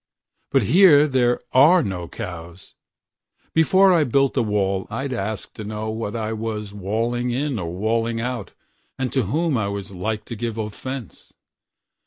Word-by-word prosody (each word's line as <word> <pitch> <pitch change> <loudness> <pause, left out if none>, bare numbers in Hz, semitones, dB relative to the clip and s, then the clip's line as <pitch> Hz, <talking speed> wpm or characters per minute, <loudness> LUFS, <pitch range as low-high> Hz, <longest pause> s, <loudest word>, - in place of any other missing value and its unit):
But 135 -3 +3
here 155 - +6
there 125 -3 +2
are 155 +7 +6
no 90 -3 -4
cows. 85 +1 -8 0.8
Before 185 +4 +5
I 165 -3 +4
built 135 +1 +2
a - - +3
wall 100 -3 0
I'd 135 0 -3
ask 110 -2 -4
to 110 - -8
knowWhat 110 +1 -4
I 110 -1 -2
was 110 -2 -4
walling 115 +5 -1
in 130 0 -1
or 85 -2 -4
walling 115 +4 -1
out, 120 -3 -4 0.5
And 130 -2 -2
to 130 -5 +1
whom 155 - 0
I 105 - -1
was 100 -1 -5
like 105 +3 -3
to 115 - -6
give 115 0 -4
offence. 115 +2 -6
115 Hz, 155 wpm, -22 LUFS, 105-130 Hz, 0.8 s, here